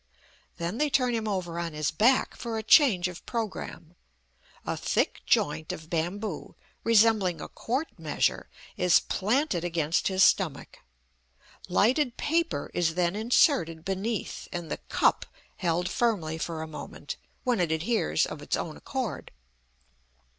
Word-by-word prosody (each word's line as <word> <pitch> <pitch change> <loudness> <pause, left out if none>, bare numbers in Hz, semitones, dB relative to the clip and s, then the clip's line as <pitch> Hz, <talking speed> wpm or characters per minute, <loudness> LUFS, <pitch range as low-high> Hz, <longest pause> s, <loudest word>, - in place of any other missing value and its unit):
Then 170 +6 -3
they 300 0 +2
turn 255 -3 +2
him 225 -1 -1
over 180 -4 -2
on 170 -2 -3
his 150 0 -1
back 235 +11 +3
for 230 -2 -4
a 220 - -3
change 215 - +5
of 180 -1 -9
programme. 190 -7 -5 0.7
A - - -1
thick - - 0
joint 155 +2 +1
of 160 0 -9
bamboo, 175 +2 -3 0.3
resembling 215 -6 +4
a - - -6
quart 265 +7 -3
measure, - - 0 0.3
is 180 -1 +5
planted 210 - 0
against 170 -1 0
his 190 0 +3
stomach; 185 -8 +1 0.9
lighted 245 - +2
paper 335 +2 0
is 165 -2 +1
then 175 +1 +1
inserted 215 - +2
beneath, 195 +3 -3
and 170 -3 -5
the - - -1
"cup" - - +2 0.3
held 175 0 0
firmly 190 -8 0
for 160 -1 -3
a - - -6
moment, 155 - -7 0.3
when 245 -5 +1
it 170 -3 +1
adheres 180 +9 +1
of - - -7
its - - -1
own - - -5
accord. 245 - -4
190 Hz, 140 wpm, -28 LUFS, 170-230 Hz, 0.9 s, change